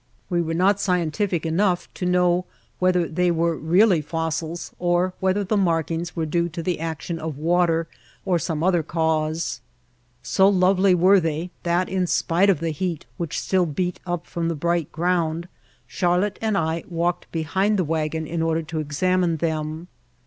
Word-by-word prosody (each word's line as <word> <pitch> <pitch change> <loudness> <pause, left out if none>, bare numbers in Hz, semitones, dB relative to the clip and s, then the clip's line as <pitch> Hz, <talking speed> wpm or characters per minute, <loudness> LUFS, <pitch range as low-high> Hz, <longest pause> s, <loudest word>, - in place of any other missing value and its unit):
We 175 -1 +2
were 165 -1 -2
not 195 +3 +3
scientific 180 -1 0
enough 175 +2 +1
to 180 - -3
know 180 0 +2 0.3
whether 180 -2 +2
they 180 +3 +1
were 170 0 +1
really 175 +3 +3
fossils 160 +2 -3
or 175 +1 +1
whether 190 +2 +1
the 200 +3 -1
mark 200 - +3
White 170 -3 +3
Heart 165 - +1
of 160 - -10
Mojave 165 - -1
ings 170 0 -6
were 165 -2 -1 0.2
due 170 - -1
to 165 0 -6
the 180 -1 -1
action 165 +1 -4
of 155 -3 -5
water 165 +1 +2 0.4
or 180 -3 +2
some 160 -2 -2
other 175 -2 +3
cause. 160 0 -1 0.6
So 190 +7 +4
lovely 190 0 +4
were 190 +3 +5
they 165 +1 -2
that 175 +1 +1
in 185 -1 -1
spite 175 +4 +2
of 180 -6 +2
the 165 -1 -1
heat 165 0 -3
which 170 -4 -3
still 185 -2 +1
beat 180 +4 -2
up 175 -1 -2
from 170 -1 -3
the 165 - -1
bright 170 0 -1
ground 170 0 0 0.4
Charlotte 180 +3 0
and 220 -2 +1
I 160 0 -1
walked 175 0 -2
behind 190 +6 0
the 185 - +2
wagon 160 0 -2
in 165 +1 -3
order 165 0 0
to 155 +1 -4
examine 170 +3 +1
them. 155 +1 -3
170 Hz, 185 wpm, -23 LUFS, 160-180 Hz, 0.6 s, were